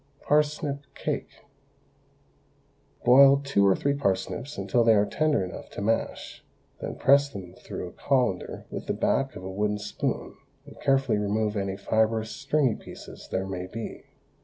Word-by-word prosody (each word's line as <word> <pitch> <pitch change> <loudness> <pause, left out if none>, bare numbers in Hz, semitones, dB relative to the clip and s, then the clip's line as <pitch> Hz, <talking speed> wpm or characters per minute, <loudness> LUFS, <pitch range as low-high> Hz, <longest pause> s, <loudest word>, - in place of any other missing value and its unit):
PARSNIP 150 -1 +1 0.2
CAKE. - - -3 1.8
Boil 135 +3 +8
two 135 -8 +2
or 95 - +5
three 140 - 0
parsnips 130 +2 -2
until 100 +5 +2
they 115 -1 +6
are 100 0 +4
tender 150 -1 +1
enough 90 - -9
to - - -7
mash, 115 +2 -2 0.4
then - - -5
press 140 +1 +4
them 95 -8 -9
through 90 - -7
a - - -15
colander 125 -9 -1
with - - -6
the - - 0
back 135 0 0
of 90 - -8
a 95 - -5
wooden 105 +2 0
spoon, 105 - -3 0.3
and - - -14
carefully 135 -5 +2
remove 105 +1 0
any 95 -1 -2
fibrous, 110 +2 +1
stringy 145 -6 +1
pieces - - -11
there 95 +1 -1
may 90 -1 -5
be. 115 +4 -7
110 Hz, 155 wpm, -27 LUFS, 100-140 Hz, 1.8 s, Boil